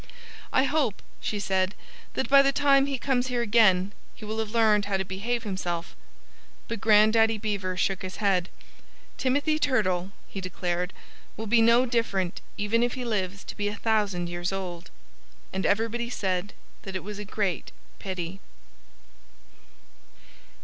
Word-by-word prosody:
"I 260 - +4
hope," 275 -7 +1 0.2
she 210 - -2
said, 190 -1 0 0.4
"that - - 0
by 275 0 +8
the 275 0 +3
time 275 -1 +4
he 275 -1 -1
comes 255 -1 0
here 245 -2 0
again 205 -4 +4 0.2
he 215 - -10
will 220 +1 -3
have 220 -1 -2
learned 215 -2 +3
how 200 -1 0
to 190 - -2
behave 230 +6 -2
himself." 180 -5 -3 0.7
But 230 -3 -4
Grandaddy 220 +1 +5
Beaver 200 -4 -2
shook 190 +1 0
his 185 0 -6
head. 190 -4 +1 0.7
"Timothy 290 +4 +1
Turtle," 190 - +1 0.2
he 195 - -6
declared, 180 0 -2 0.5
"will 220 - -4
be 225 +2 +4
no 235 +2 +5
different 215 -7 -1 0.2
even 210 +3 +1
if 240 0 +1
he 255 -1 -4
lives 200 -4 -2
to - - -8
be 205 -1 -1
a 205 - -2
thousand 205 -5 0
years 175 +1 -3
old." 185 -3 -5 0.6
And 190 0 0
everybody 230 +3 0
said 190 -3 -2 0.3
that 190 -1 -7
it 185 - -3
was 205 +1 -7
a - - -4
great 200 -3 -2 0.3
pity. 185 -1 -5
210 Hz, 155 wpm, -27 LUFS, 190-235 Hz, 0.7 s, by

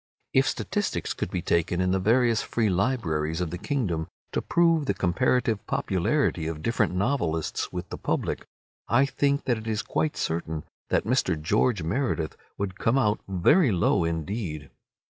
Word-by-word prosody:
If - - +4
statistics - - -1
could - - -3
be - - -3
taken 85 +1 +1
in 90 0 +2
the 95 - +2
various 115 +3 +3
free 115 -3 0
libraries 85 -7 0
of 90 -3 -2
the 90 - -5
kingdom 100 - -1 0.2
to - - -1
prove 165 -4 +2
the 100 - +1
comparative 110 +4 +1
popularity 95 - 0
of 80 -1 -5
different 110 -5 +1
novelists 90 - -1
with 90 -1 -5
the - - -6
public, - - -1 0.4
I 125 +6 +4
think 140 +1 +1
that 120 -3 +1
it 110 - -9
is 110 -1 -1
quite 155 - -1
certain 80 -2 -2 0.3
that - - +1
Mr. 105 -9 +1
George 105 +4 +1
Meredith 85 - -1 0.2
would 100 0 -4
come 115 +4 +2
out 105 -5 +2
very 100 - +4
low 85 -2 +2
indeed. 80 - -3
100 Hz, 160 wpm, -26 LUFS, 85-120 Hz, 0.4 s, If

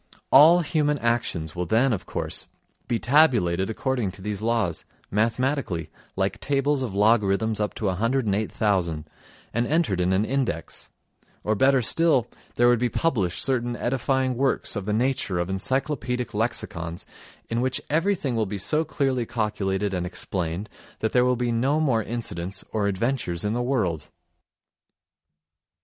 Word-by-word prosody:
All 160 +6 +8
human 150 -2 +1
actions 110 - -1
will 90 -1 -2
then, 120 +6 +3
of 95 -4 -4
course, - - -3 0.4
be 120 - +1
tabulated 115 - +3
according 125 -2 -1
to 95 - -13
these 105 -1 -3
laws, 110 -7 0 0.3
mathematically, 115 - 0 0.2
like 95 +2 -1
tables 140 +2 +1
of 115 -7 -3
logarithms 105 0 +2
up 105 -1 -2
to 110 - -4
108,000, 100 - 0 0.5
and 120 +1 0
entered 150 - +1
in 90 +1 +1
an 95 +3 +2
index; 130 - -3 0.5
or, 110 - +1
better 135 +3 +3
still, 160 -2 +3 0.3
there 120 - +4
would 120 -1 +4
be 125 0 +1
published 110 - 0
certain 120 -3 0
edifying 130 +1 0
works 135 0 0
of 100 -3 -3
the 105 - -1
nature 115 -4 0
of 85 +2 -1
encyclopaedic 125 +3 -1
lexicons, 85 -6 -3 0.4
in 115 +1 -1
which 130 0 0
everything 165 -4 0
will 110 -2 0
be 100 +1 -4
so 155 - +1
clearly 135 -6 -1
calculated 105 -4 -1
and 90 -1 -2
explained 90 +1 -3 0.3
that 110 - 0
there 125 0 +4
will 125 0 +3
be 120 0 -1
no 135 +6 +1
more 130 -8 +2
incidents 100 -5 -4
or 105 -2 0
adventures 100 -3 -1
in 105 - 0
the 120 - -1
world. 110 - -1
115 Hz, 150 wpm, -25 LUFS, 95-130 Hz, 0.5 s, All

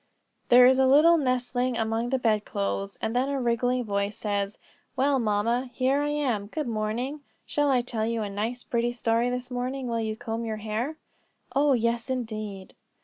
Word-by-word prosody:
There 245 +1 +8
is 260 +1 +5
a 265 - +5
little 305 +6 +6
nestling 255 -2 0
among 225 +2 -1
the 265 - +1
bed 220 -4 +1
clothes, 200 -1 -3
and 225 - -1
then 260 +2 +1
a 280 -1 -1
ringing 245 +1 +1
voice 200 -1 -2
says: 200 -1 -2 0.4
"Well, 275 +1 +2
mamma, 230 +3 0
here 270 +2 +1
I 295 - 0
am; 255 -9 -1
good 300 +8 -3
morning. 235 +6 -2 0.2
Shall 290 -1 +1
I 255 -3 +3
tell 225 -3 -2
you 230 -1 -1
a - - -3
nice 225 +5 -3
pretty 240 0 -1
story 235 0 +1
this 250 +1 -4
morning, 255 +1 -3
while 230 -1 -1
you 220 -1 -2
comb 230 -1 -4
your 220 -1 -3
hair?" 220 +8 -3 0.6
"Oh, 285 0 +4
yes, 235 0 0
indeed." 215 -6 -4
240 Hz, 185 wpm, -27 LUFS, 220-260 Hz, 0.6 s, There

